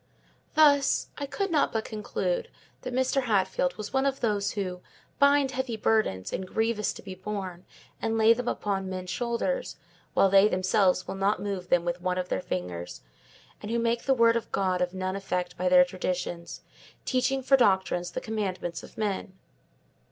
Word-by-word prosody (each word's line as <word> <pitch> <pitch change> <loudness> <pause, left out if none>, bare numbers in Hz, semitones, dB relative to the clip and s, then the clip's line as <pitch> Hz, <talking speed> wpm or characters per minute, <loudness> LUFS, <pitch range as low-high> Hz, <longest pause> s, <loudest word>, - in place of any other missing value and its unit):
Thus, 285 -3 +4
I 285 - -3
could 390 +6 -2
not 300 -3 +2
but 220 -1 -2
conclude 470 - -2 0.3
that - - -5
Mr. 260 +1 +1
Hatfield 190 -4 +1
was 215 - -7
one 265 +1 +2
of 270 0 -1
those 205 -3 0
who 185 -3 -4 0.4
"bind 280 -1 +4
heavy 260 -4 -3
burdens, 210 - 0
and 190 - -3
grievous 220 +1 0
to - - -12
be 190 - -7
borne, 185 -2 -6 0.4
and 225 0 0
lay 220 +1 +6
them 245 +1 -5
upon 195 -4 -2
men's 185 -1 -5
shoulders, 245 - -2 0.4
while - - +5
they 195 +1 +6
themselves 185 -1 +2
will - - -3
not 195 +2 +1
move 195 -3 -4
them 175 -1 +3
with 175 0 -2
one 180 0 -1
of 180 0 -3
their - - -1
fingers"; 90 - -5 0.6
and 210 - -6
who 235 - 0
"make 235 0 0
the 270 - +3
word 230 -1 +5
of 235 - -3
God 185 -2 0
of 180 +1 -1
none 185 0 -2
effect 180 -2 -3
by 180 +1 0
their 180 0 +7
traditions, 180 -1 -4 0.4
teaching 265 +1 +1
for 270 +1 +5
doctrines 190 -6 +2
the - - -5
commandments 185 -6 -3
of - - -14
men." 200 -3 -3
205 Hz, 180 wpm, -27 LUFS, 185-235 Hz, 0.6 s, their